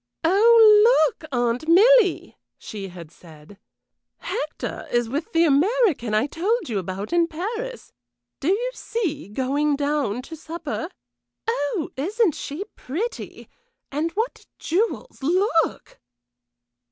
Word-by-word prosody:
"Oh! 425 +4 +6 0.2
Look, 310 +1 -5
Aunt 245 +3 -1
Milly!" 415 +2 +5 0.2
she 200 -2 -7
had 175 -4 -11
said. 165 +3 -16 0.6
"Hector 300 +1 -5
is 240 -1 +1
with 285 +7 -4
the 330 0 +3
American 310 - +2
I 215 - +2
told 375 - -1
you 210 -4 -1
about 190 - -5
in 340 -1 +3
Paris. 445 +9 -5 0.5
Do 275 - -4
you 460 +7 +1
see, 345 - -4
going 280 +6 0
down 280 -5 -1
to 325 - -9
supper. 320 0 -5 0.6
Oh, 310 -6 -1
isn't 385 - +1
she 295 +8 -5
pretty! 380 - -5 0.4
and 300 +4 -1
what 450 +6 -3
jewels 395 +1 -2
look!" 330 +2 0
320 Hz, 115 wpm, -23 LUFS, 260-415 Hz, 0.6 s, Oh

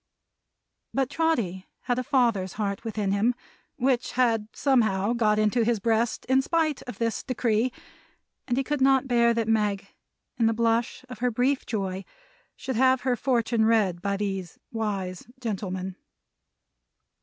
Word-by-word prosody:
But 270 0 0
Trotty 230 - 0
had 245 -1 -1
a - - -2
father's 235 -9 +1
heart 200 -2 -3
within 215 -3 -2
him; 220 +5 +2 0.4
which 255 -1 0
had 230 -4 +2
somehow 220 -6 +2
got 215 -3 +2
into 215 +3 +2
his 230 -1 +1
breast 225 +1 0
in 260 +1 +3
spite 310 -1 0
of 245 - -7
this 230 -1 -1
decree; 240 -2 0 0.8
and 245 -1 0
he 270 - +2
could 295 0 -2
not 270 0 +4
bear 235 -2 +4
that 230 -1 0
Meg, 210 -3 0 0.5
in 230 - +4
the 225 - +1
blush 230 +2 0
of 250 -4 -9
her 250 +1 +1
brief 255 +4 0
joy, 195 -3 -3 0.5
should 260 -3 -4
have 260 0 +4
her 255 -1 +1
fortune 235 -2 +1
read 205 -6 +2
by 200 0 -1
these 195 -3 -4
wise 200 -5 -3
gentlemen. 190 -5 -4
230 Hz, 150 wpm, -26 LUFS, 205-255 Hz, 0.8 s, not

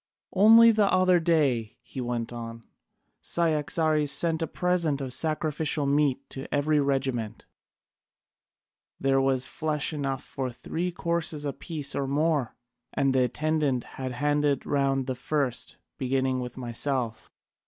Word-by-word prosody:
Only 225 +4 +8
the 210 -2 +2
other 185 -1 +4
day," 145 -10 +1
he 130 - -7
went 120 -1 -3
on, 115 -1 -8 0.6
"Cyaxares 155 -2 +1
sent 165 +3 +2
a 165 - 0
present 175 -5 0
of 130 -2 -4
sacrificial 155 0 0
meat 140 -1 +1
to 135 - -8
every 150 +1 +2
regiment. 135 -6 -1 1.5
There 135 0 +2
was 135 -1 +2
flesh 155 -1 -1
enough 135 -3 -3
for 130 -1 -4
three 170 +8 -4
courses 170 -3 -2
apiece 145 0 -4
or 140 - -2
more, 145 -3 0 0.4
and 135 -1 +1
the 130 -1 +3
attendant 150 -2 0
had 130 -1 -6
handed 145 +1 +1
round 135 -2 +1
the 130 - -2
first, 130 0 -2 0.2
beginning 130 0 0
with 125 0 -6
myself. 120 -1 -3
140 Hz, 130 wpm, -27 LUFS, 130-155 Hz, 1.5 s, Only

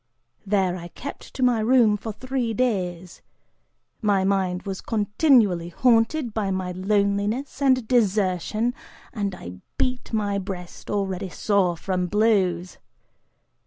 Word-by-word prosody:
There, 190 -3 +1
I 170 -1 -8
kept 280 +10 -9
to 260 - -1
my 245 -2 +3
room 225 -1 +4
for 220 +2 -5
three 250 0 -3
days. 185 -7 -2 0.8
My 200 -3 +2
mind 190 -2 0
was 195 -2 -5
continually 210 - +2
haunted 235 - +2
by 215 -3 -1
my 185 -1 -2
loneliness 200 +7 0
and 260 -4 +3
desertion, 215 0 +1 0.4
and 200 -4 -2
I 90 - -9 0.2
beat 255 -1 -2
my 205 -3 0
breast, 185 -2 -8
already 195 -2 -2
sore 185 -3 +1
from 180 0 -2
blows. 190 -4 +1
205 Hz, 125 wpm, -24 LUFS, 185-230 Hz, 0.8 s, room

